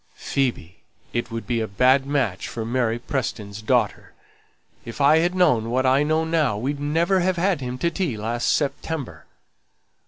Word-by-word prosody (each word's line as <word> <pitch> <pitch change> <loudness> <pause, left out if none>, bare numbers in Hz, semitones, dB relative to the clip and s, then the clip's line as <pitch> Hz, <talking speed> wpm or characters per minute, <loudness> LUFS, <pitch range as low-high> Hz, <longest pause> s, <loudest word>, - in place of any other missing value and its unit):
"Phoebe, 120 -10 -2 0.3
it 120 0 -2
would 115 -1 -5
be 120 -2 -1
a 110 - -2
bad 130 +6 +3
match 135 -10 -1
for 115 -1 -5
Mary 120 -1 0
Pearson's 110 -5 -4
daughter. 115 -1 0 0.7
If 115 - -9
I 150 +3 +5
had 175 +2 0
known 125 -12 +3
what 130 +2 +1
I 130 +2 +4
know 155 +2 +1
now 155 -10 +1
we'd 140 +6 -3
never 165 +6 +1
have 185 0 0
had 180 -3 +1
him 125 0 -4
to 170 +6 0
tea 165 - -2
last 115 +3 -1
September." 145 -1 -3
130 Hz, 165 wpm, -23 LUFS, 115-155 Hz, 0.7 s, I